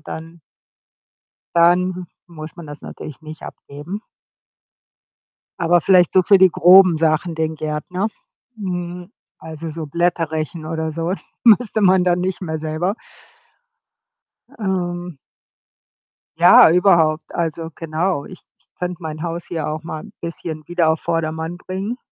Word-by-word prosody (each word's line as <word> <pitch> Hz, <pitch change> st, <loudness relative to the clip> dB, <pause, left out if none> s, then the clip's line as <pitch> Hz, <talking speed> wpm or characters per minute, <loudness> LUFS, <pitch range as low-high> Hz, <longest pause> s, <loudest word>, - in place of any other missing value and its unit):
Dann 165 Hz, +2 st, -9 dB, 1.1 s
dann 180 Hz, +1 st, +3 dB, 0.2 s
muss 155 Hz, -2 st, -10 dB
man 170 Hz, -, -10 dB
das 145 Hz, 0 st, -10 dB
natürlich 150 Hz, 0 st, -9 dB
nicht 155 Hz, -1 st, -10 dB
abgeben. 150 Hz, +9 st, -8 dB, 1.6 s
Aber 175 Hz, 0 st, +3 dB
vielleicht 180 Hz, -1 st, +4 dB
so 185 Hz, -, +6 dB
für 195 Hz, +2 st, +5 dB
die 190 Hz, 0 st, +6 dB
groben 180 Hz, 0 st, +6 dB
Sachen 160 Hz, +1 st, +1 dB
den 160 Hz, 0 st, -2 dB
Gärtner. 155 Hz, +6 st, -3 dB, 0.5 s
Mhm. 180 Hz, -2 st, -5 dB, 0.3 s
Also, 160 Hz, 0 st, -7 dB
so 160 Hz, 0 st, -6 dB
Blätter 170 Hz, 0 st, 0 dB
rechen 155 Hz, +1 st, -4 dB
oder 160 Hz, 0 st, -3 dB
so 165 Hz, +2 st, -2 dB, 0.3 s
müsste 225 Hz, -1 st, +4 dB
man 185 Hz, -2 st, +4 dB
da 175 Hz, -1 st, +3 dB
nicht 180 Hz, +2 st, -3 dB
mehr 160 Hz, -3 st, -3 dB
selber. 160 Hz, +5 st, -2 dB, 1.7 s
Ähm 175 Hz, -4 st, -3 dB, 1.2 s
Ja, -, -, +8 dB
überhaupt. 170 Hz, -3 st, +3 dB
Also, 165 Hz, -1 st, -3 dB
genau. 165 Hz, 0 st, -2 dB
Ich 185 Hz, -, -12 dB
k -, -, -33 dB, 0.3 s
könnte 180 Hz, 0 st, -4 dB
mein 155 Hz, -1 st, -6 dB
Haus 170 Hz, 0 st, -4 dB
hier 160 Hz, -3 st, -3 dB
auch 155 Hz, +1 st, -4 dB
mal 160 Hz, -2 st, -6 dB
'n 215 Hz, -, -13 dB
bisschen 165 Hz, -2 st, -6 dB
wieder 175 Hz, -2 st, +1 dB
auf 160 Hz, 0 st, +1 dB
Vordermann 165 Hz, 0 st, -3 dB
bringen. 195 Hz, +6 st, -5 dB
170 Hz, 135 wpm, -20 LUFS, 160-180 Hz, 1.7 s, Ja